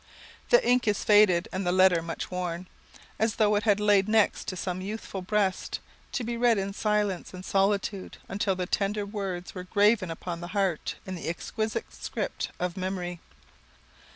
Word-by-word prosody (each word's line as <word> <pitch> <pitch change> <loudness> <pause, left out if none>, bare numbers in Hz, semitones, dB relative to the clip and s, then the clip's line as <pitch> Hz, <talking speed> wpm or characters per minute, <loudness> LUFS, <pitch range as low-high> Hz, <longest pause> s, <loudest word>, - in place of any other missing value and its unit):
The - - +5
ink 245 -1 +3
is 210 - +1
faded 205 -5 +5
and 190 - -2
the 175 - +1
letter 185 -2 +5
much 165 +2 -5
worn, 180 0 -3 0.5
as 220 0 +1
though 210 -2 +3
it 205 - +2
had 205 -2 +4
lain 205 -2 +4
next 215 -1 +2
to 185 - -3
some 180 0 -3
youthful 200 -1 -5
breast, 195 0 0 0.3
to 255 - -1
be 235 +1 -3
read 235 -2 +4
in 195 0 -2
silence 210 -4 -1
and 185 +1 -8
solitude 195 0 0
until 195 -1 0
the 180 0 -2
tender 205 +3 0
words 195 -4 -4
were 180 - -6
graven 205 -1 +3
upon 170 +1 -5
the 175 +4 -5
heart 190 -5 0
in 190 - -5
the 175 - -6
exquisite 220 +5 -3
script - - -4
of 180 0 -2
Memory. 185 -2 -3
195 Hz, 175 wpm, -28 LUFS, 180-210 Hz, 0.5 s, The